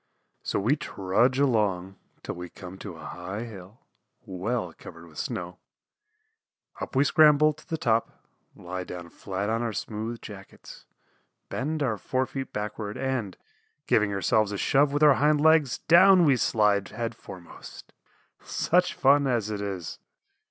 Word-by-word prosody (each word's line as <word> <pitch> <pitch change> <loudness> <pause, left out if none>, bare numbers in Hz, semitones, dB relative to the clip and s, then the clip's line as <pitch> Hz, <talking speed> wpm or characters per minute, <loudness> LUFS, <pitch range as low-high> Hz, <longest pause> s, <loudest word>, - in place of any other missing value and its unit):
So - - -2
we 115 +9 +2
trudge 125 - 0
along 105 -9 +1 0.3
till - - -4
we 90 0 -8
come 95 -1 -11
to 95 -5 -8
a 80 -1 -11
high 90 +6 -6
hill, 105 -1 -11 0.4
well 100 +7 -3
covered - - -12
with - - -11
snow; - - -5 1.2
up - - -6
we 135 - +5
scramble 155 0 +5
to 155 - -19
the 160 - -2
top, 115 -5 -1 0.3
lie 90 +1 -6
down 90 -1 -8
flat 100 +2 -4
on 115 +1 0
our 115 -2 -2
smooth 110 +3 -5
jackets, 100 -2 -12 0.6
bend 150 +3 -2
our 110 -6 -1
fore 130 +6 -1
feet 135 0 -6
backward 105 0 -5
and, 130 -7 -3 0.5
giving 105 -2 +2
ourselves 100 +2 +1
a 100 - -3
shove 140 +7 +3
with 145 +1 +1
our 150 -2 +8
hind 150 0 +4
legs, 155 -4 +4
down 180 +1 +6
we 140 -3 +5
slide 105 -4 +2
head 115 +1 -4
foremost. 90 -5 -12 0.5
Such 180 +1 +1
fun 140 +1 +4
as 115 -4 0
it 105 -1 -4
is! 95 -5 -5
110 Hz, 150 wpm, -26 LUFS, 100-140 Hz, 1.2 s, our